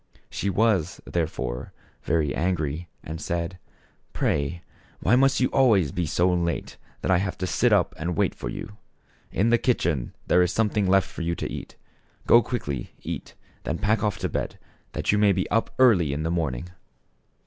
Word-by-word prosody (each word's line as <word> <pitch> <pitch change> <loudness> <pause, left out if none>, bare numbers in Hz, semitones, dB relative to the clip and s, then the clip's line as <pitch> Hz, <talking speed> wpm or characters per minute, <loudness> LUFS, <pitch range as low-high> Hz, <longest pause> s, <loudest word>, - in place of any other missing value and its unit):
She 100 - -2
was, 100 -5 +1
therefore, 65 -7 -3 0.3
very 75 -2 +1
angry 85 -1 -1
and 80 +1 -6
said: 85 +2 -3 0.3
" - - -38
Pray, 70 +5 -1 0.4
why 110 - +3
must 135 +1 +4
you 130 - +3
always 110 - +4
be 90 -2 -2
so 90 +4 +2
late 85 -1 -2 0.2
that - - 0
I 90 - +5
have 95 -1 -2
to 90 - -2
sit 85 - +2
up - - +3
and 85 +2 -2
wait - - +2
for - - -6
you? 105 +11 -7 0.5
In 110 +6 +2
the 120 - +4
kitchen 80 - 0
there 90 - +4
is 90 0 +2
something 105 -2 +1
left 95 0 +4
for - - -8
you 85 0 -1
to - - -4
eat. - - -7 0.5
Go 120 - +7
quickly, 70 - -4
eat, - - -6 0.3
and 80 - -2
then - - -12
pack 110 +1 +2
off 105 -2 0
to - - -2
bed - - -3 0.4
that - - 0
you 105 - +2
may 105 -1 +5
be 95 0 -1
up 115 +1 +2
early 95 - +5
in 75 +2 -2
the 80 - -1
morning." 80 -2 -2
90 Hz, 190 wpm, -25 LUFS, 80-105 Hz, 0.5 s, Go